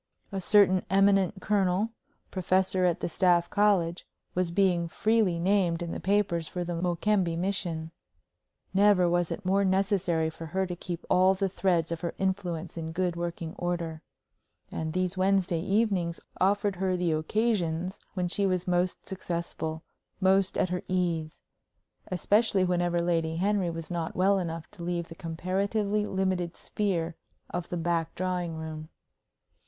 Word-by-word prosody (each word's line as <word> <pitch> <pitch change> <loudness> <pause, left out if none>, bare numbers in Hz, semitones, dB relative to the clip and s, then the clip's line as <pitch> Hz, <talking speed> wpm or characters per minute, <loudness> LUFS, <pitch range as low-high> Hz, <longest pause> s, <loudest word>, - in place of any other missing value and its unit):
A 195 -1 -3
certain 190 -1 +5
eminent 195 0 +3
colonel, 200 +1 +1 0.4
professor 185 0 +1
at 175 -2 +1
the - - 0
Staff 175 -1 +2
College, 190 -5 +2 0.3
was 180 -1 0
being 175 -2 +2
freely 215 -1 +2
named 175 -1 +1
in 170 - -4
the - - -4
papers 190 -4 +1
for 180 +2 -3
the 175 0 -3
Mokembe 175 +1 +1
mission. 170 -3 -2 0.8
Never 195 -2 +5
was 175 0 +1
it 200 - -5
more 195 +2 +3
necessary 190 -4 +1
for 165 +1 -8
her 190 +4 0
to 180 -1 -4
keep 175 0 -6
all 185 +1 +4
the 195 +1 0
threads 175 -3 0
of 165 - -3
her 170 - -3
influence 180 -3 -2
in 160 -1 -4
good 180 0 0
working 170 -1 -4
order. 170 -2 -2 0.7
And 160 0 -3
these 185 +1 -1
Wednesday 185 -3 +2
evenings 195 -3 +1 0.2
offered 200 0 +2
her 185 0 0
the 175 -2 +1
occasions 180 0 0 0.2
when 180 -2 0
she 195 +3 0
was 185 -1 -1
most 180 0 0
successful, 170 -4 -4 0.4
most 190 0 +3
at 185 - +1
her 180 0 -2
ease 170 -4 -1 0.6
especially 200 +3 +2
whenever 175 -1 +1
Lady 165 -2 0
Henry 195 +1 +1
was 165 0 -6
not 170 -2 -3
well 195 +2 +3
enough 165 -2 -4
to - - -12
leave 170 -1 -2
the - - -7
comparatively 200 +5 -1
limited 185 -2 -1
sphere 175 -5 -1 0.4
of 175 -1 -4
the 175 - -2
back 165 -1 -1
drawing 180 -2 -2
room. 160 -1 -6
180 Hz, 150 wpm, -28 LUFS, 170-195 Hz, 0.8 s, certain